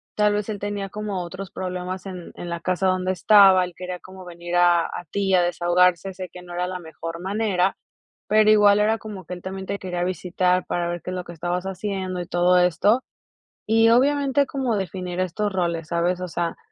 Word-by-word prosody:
tal 210 0 +3
vez 210 0 -1
él 205 -2 -4
tenía 205 -1 -4
como 205 -2 -4
otros 185 +2 -8
problemas 185 0 -5
en 180 -3 -8
en 175 - -7
la 170 0 -3
casa 185 +1 0
donde 185 0 +1
estaba, 190 0 +6
él 180 - -10
quería 180 -1 -6
como 185 0 -12
venir 175 0 -6
a 175 -1 +4
a - - -6
ti 195 -1 0
a 180 - +5
desahogarse, 175 +1 +2
sé 185 -1 -7
que 180 - -10
no 175 -1 -11
era 180 +1 -1
la 185 0 -5
mejor 165 0 -7
manera, 195 -1 0 0.5
pero 215 +1 +5
igual 205 -1 +6
era 220 +2 +2
como 205 -4 -8
que 180 - -7
él 175 - -11
también 190 0 -6
te 200 - -3
quería 180 -2 -3
visitar 180 0 0
para 175 -1 -1
ver 175 0 -4
qué 185 - -5
es - - -4
lo 180 - -4
que 175 - -9
estabas 175 +2 -3
haciendo 190 -1 -3
y 175 - -7
todo 180 +1 +3
esto, 190 +8 +3 0.7
y 225 +1 +5
obviamente 280 +2 +3
como 260 -5 -1
definir 185 -2 -4
estos 200 +3 -1
roles, 170 -4 -1
¿sabes? 175 +1 0
O 180 - -4
sea, 170 0 -2
185 Hz, 210 wpm, -23 LUFS, 175-200 Hz, 0.7 s, estaba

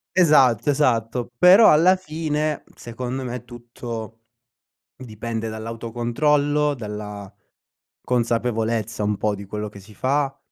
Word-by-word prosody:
Esatto, 135 - +4
esatto, 120 -4 0
però 190 +5 +8
alla 170 +5 +5
fine, 155 -3 -3
secondo 125 +3 -5
me, 125 -1 -5
tutto 120 -2 -8 0.8
dipende 115 -2 -5
dall'autocontrollo, 120 +7 0
dalla 105 -4 -7 0.7
consapevolezza 115 -2 -1
un 105 0 0
po' 105 +1 -1
di 100 0 -9
quello 105 +1 -5
che 100 - -12
si 105 +2 -16
fa, 135 +4 -1
120 Hz, 110 wpm, -22 LUFS, 110-145 Hz, 0.8 s, però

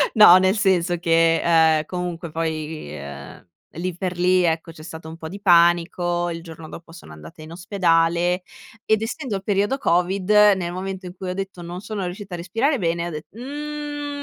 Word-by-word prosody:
No, 200 -4 +9
nel 190 +3 +2
senso 180 -3 +2
che, 165 0 +3
uhm, 160 -2 +4
comunque 175 -2 -5
poi 160 - -4
ehm, 70 +4 -10 0.3
lì 175 +1 -4
per 180 -1 -4
lì, 180 0 +3
ecco, 165 0 -1
c'è 155 - -14
stato 160 0 -9
un 160 +1 -9
po' 160 -1 -8
di 200 +3 -8
panico, 175 -1 +3
il 165 0 -6
giorno 160 -1 -10
dopo 165 +1 -11
sono 75 - -13
andata 80 - -13
in 160 - -11
ospedale 175 -1 +1 0.4
ed 220 0 +2
essendo 240 -2 -4
il 195 - -5
periodo 205 +6 0
covid, 185 0 0 0.3
nel 175 -2 -3
momento 190 0 -5
in 180 +1 -8
cui 185 0 -6
ho - - -2
detto 195 -2 -6
non 175 +1 -7
sono 210 -2 -5
riuscita 190 +1 -7
a - - -3
respirare 225 - 0
bene, 170 -1 -1
ho - - -4
det: 155 0 -7
"Mhmm 290 +2 -5
175 Hz, 190 wpm, -22 LUFS, 165-195 Hz, 0.4 s, No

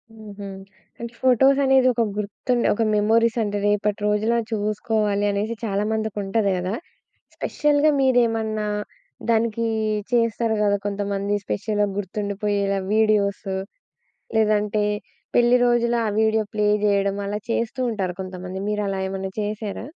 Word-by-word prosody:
హుహు. 205 -2 -9 0.5
అంటే 235 0 -6
ఫోటోసనేది 265 +1 +4
ఒక 235 - 0 0.2
గుర్తుండే, 235 +4 -1
ఒక 225 - -2
మెమోరీసంటే, 220 0 +2
రేపటి 205 0 +1
రోజులా 215 +3 +2
చూసుకోవాలనేసి 210 0 0
చాలా 200 -1 0
మందికుంటది 210 -1 0
గదా! 180 +3 -2 0.6
స్పెషల్‌గా 295 +1 +2
మీరేమన్నా 225 -5 +2 0.6
దానికి 230 0 +1 0.5
చేస్తారు 230 -1 +1
గదా! 205 -1 +3
కొంతమంది 200 0 -1
స్పెషల్‌గా 210 0 0
గుర్తుండిపోయేలా 200 0 -1
వీడియోసు 205 -3 +1 0.8
లేదంటే 210 0 +2 0.5
పెళ్లి 240 +1 +5
రోజులా 240 0 +2
ఆ - - +1
వీడియో 220 0 +2
ప్లే 210 -1 +1 0.2
జేయడం 200 -1 +2
అలా 205 +1 -2
చేస్తూ 230 +2 -1
ఉంటారు 190 -5 -2
కొంతమంది. 185 0 -7
మీరు 210 0 -1
అలా 195 - -2
ఏమన్నా 190 0 -4
చేశారా? 210 +1 -4
210 Hz, 110 wpm, -23 LUFS, 200-230 Hz, 0.8 s, పెళ్లి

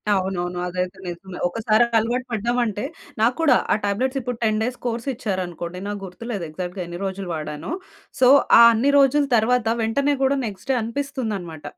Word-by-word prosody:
అవునవును. 180 -2 -2
అదైతే 180 +1 -3
నిజమే. 180 +1 -7
ఒకసారి 220 +3 +2 0.2
అలవాటు 245 +3 -1
పడ్డామంటే 230 -1 -1 0.4
నాకూడా 255 +4 +4 0.2
ఆ - - +4
టాబ్లెట్స్ 255 +7 0
ఇప్పుడు 245 -1 -4
10 215 -1 +2
డేస్ 250 +2 -3
కోర్స్ 235 +2 -3
ఇచ్చారనుకోండి 180 -6 -4
నా 205 - -2
గుర్తులేదు 195 +1 -5
ఎగ్జాక్ట్‌గా 180 +3 -5
ఎన్ని 175 +1 -7
రోజులు 190 0 -4
వాడానో. 150 - -5 0.5
సో, 255 - +6 0.3
ఆ - - +10
అన్ని 245 +6 +2
రోజుల 280 +2 +4
తర్వాత 240 +2 +2 0.2
వెంటనే 280 +6 +1
కూడా 270 +1 +2
నెక్స్ట్ 210 +4 -8
డే - - +2
అనిపిస్తుందన్నమాట. 225 - -4
220 Hz, 155 wpm, -22 LUFS, 180-250 Hz, 0.5 s, ఆ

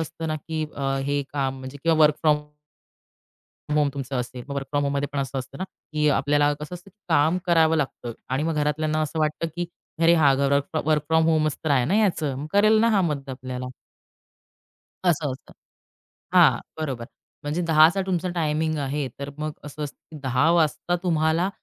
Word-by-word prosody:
असतं 160 0 -5
ना, 155 - -1
की 155 +1 -4
अ, 135 -1 -1
हे 145 0 0
काम, 135 -2 -1
म्हणजे, 130 +2 -8
किंवा 165 -1 +3
वर्क 150 0 +6
फ्रॉम 150 -2 +3 1.3
होम 150 -1 +3
तुमचं 135 -1 -4
असेल. 125 0 -4
मग, 140 - -4
वर्क 140 -1 -3
फ्रॉम 145 -1 +1
होममध्ये 140 0 -1
पण 145 - -2
असं 135 0 -2
असतं 130 +1 -8
ना, 185 - -2
की 155 -4 -3
आपल्याला 145 +1 +3
कसं 150 +4 -6
असतं, 185 +3 -12
की 205 - -44
काम 160 +3 +3
करावं 160 -2 +4
लागतं 130 -5 -3 0.2
आणि 135 +3 0
मग 165 0 0
घरातल्यांना 155 +1 0
असं 155 +1 -3
वाटतं, 155 +2 0
की 175 - -2 0.4
अरे! 170 +1 +6
हा 145 -4 +5
घर 140 +1 +2 0.3
वर्क 155 -2 +2
फ्रॉम 160 0 +4
होमचं 155 -2 +2
तर 155 - 0
आहे 130 -3 +3
ना 185 - 0
याचं. 165 -10 +1
मग 145 +3 -5
करेल 215 +2 +5
ना 230 - +4
हा 205 - +3
मदत 145 -4 -2
आपल्याला. 130 0 -6 1.4
असं 155 -5 +1
असतं, 130 - -12 0.8
हां, - - +6 0.2
बरोबर. 135 -7 -3 0.4
म्हणजे, 150 +4 -2
10:00 160 +4 +6
तुमचा 185 -1 -1
टायमिंग 155 -1 0
आहे 140 0 -2
तर 140 0 -5
मग 155 0 -3
असं 150 +1 -7
असतं, 145 - -7 0.2
की 160 - -9
10:00 130 +4 +2
वाजता 170 +1 +1
तुम्हाला 165 +1 +1
150 Hz, 190 wpm, -24 LUFS, 140-160 Hz, 1.4 s, वर्क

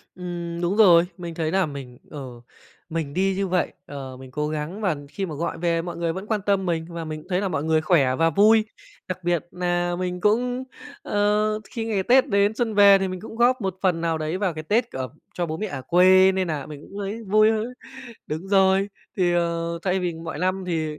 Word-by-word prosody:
Ừm, 175 -1 -5
đúng 175 +4 0
rồi, 175 -5 +7
mình 170 -2 -6
thấy 160 -1 -1
nà 190 -1 +2
mình, 135 -4 -8
ờ, 130 -5 -8 0.5
mình 160 -4 -3
đi 190 +1 +1
như 195 -1 -1
vậy, 180 -1 0
ờ, 135 -2 -7
mình 130 0 -12
cố 150 +3 -2
gắng 155 +7 -4
và 185 -8 0
khi 195 +5 -4
mà 155 - -6
gọi 170 +4 -3
về 165 -1 0
mọi 175 -1 -6
người 170 -1 -1
vẫn 190 +4 -6
quan 215 -2 0
tâm 195 -2 +2
mình 165 -1 -1
và 170 -1 -6
mình 155 -1 -5
cũng 180 - -18
thấy 180 0 +1
là 200 - -1
mọi 145 -4 -2
người 160 0 +2
khỏe 150 -6 +3
và 165 0 +3
vui. 215 +6 +5 0.4
Đặc 185 -1 -5
biệt 175 -1 0
nà 175 0 -1
mình 180 -1 -3
cũng, 245 +5 +1 0.4
ờ, 210 +1 +1
khi 225 -2 -4
ngày 210 -4 0
Tết 255 +5 +4
đến 200 +1 +2
xuân 230 -3 -1
về 200 -1 +7
thì 190 -1 -1
mình 185 -1 -5
cũng 225 +1 -9
góp 245 +1 +3
một 190 -2 -2
phần 180 -3 +2
nào 165 -1 0
đấy 155 +4 -2
vào 190 -5 -1
cái 155 - -6
Tết 230 +7 +1
ở 130 -1 -4 0.3
cho 175 -1 -1
bố 160 0 -4
mẹ 215 - -3
ở 140 -8 -6
quê, 185 +3 +5
nên 185 -2 -1
nà 145 -4 -3
mình 150 -2 -9
cũng 200 - -10
thấy 205 +3 -4
vui 215 +2 +4
hơn. 225 +3 -2 0.5
Đúng 160 +6 -5
rồi. 195 0 +4 0.3
Thì, 175 -2 +2
ờ, 170 0 -1
thay 190 0 0
vì 175 -2 -1
mọi 165 -2 -6
năm 185 +1 -1
thì 155 -3 -2
180 Hz, 235 wpm, -24 LUFS, 160-200 Hz, 0.5 s, rồi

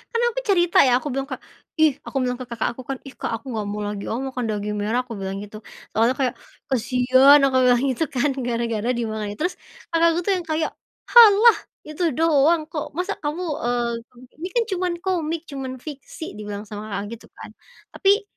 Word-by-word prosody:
kan - - +3
aku - - -3
cerita 350 -4 +4
ya 245 - +4
aku 295 -2 -5
bilang 270 +1 -2
ke 260 - -4 0.4
"Ih," 310 -3 +3
aku - - -6
bilang 250 0 -2
ke 255 - -7
kakak 235 -1 -2
aku 245 +1 -11
kan 270 - -2
"Ih, 270 - -10
Kak - - -5
aku 265 - -7
gak 215 -2 -3
mau 210 +1 -4
lagi 205 -1 -4
ah - - -2
makan 260 -3 -3
daging 210 -1 -2
merah." 225 +5 0
Aku 230 -4 -8
bilang 195 0 -4
gitu. 215 +1 -10 0.3
Soalnya 230 +4 +2
kayak, 260 -2 0 0.4
"Kasian." 255 +3 +5
Aku 265 -1 +3
bilang 245 -1 +4
gitu 260 +6 -1
kan 270 +2 0
gara-gara 235 -2 -1
di 235 - -1
mana. 220 -1 -3
Terus, 355 +4 -3 0.3
kakakku 335 0 +3
tuh 400 - +1
yang 350 - -8
kayak, 315 0 -1 0.4
"Halah, 460 -1 +8 0.3
itu 305 +3 -5
doang 320 +1 +3
kok 300 -2 -5
masa 365 +4 -1
kamu, 300 +4 -3 0.2
eee, 240 -1 0 0.5
ini 345 - -3
kan 475 - +4
cuman 365 -1 0
komik, 335 -4 -1
cuman 265 -2 -5
fiksi." 305 +2 -8
Dibilang 205 -1 -6
sama 210 0 -8
kakak 200 -1 -4
gitu - - -17
kan. - - -10 0.4
Tapi, 400 +2 +3
260 Hz, 200 wpm, -23 LUFS, 230-325 Hz, 0.5 s, Halah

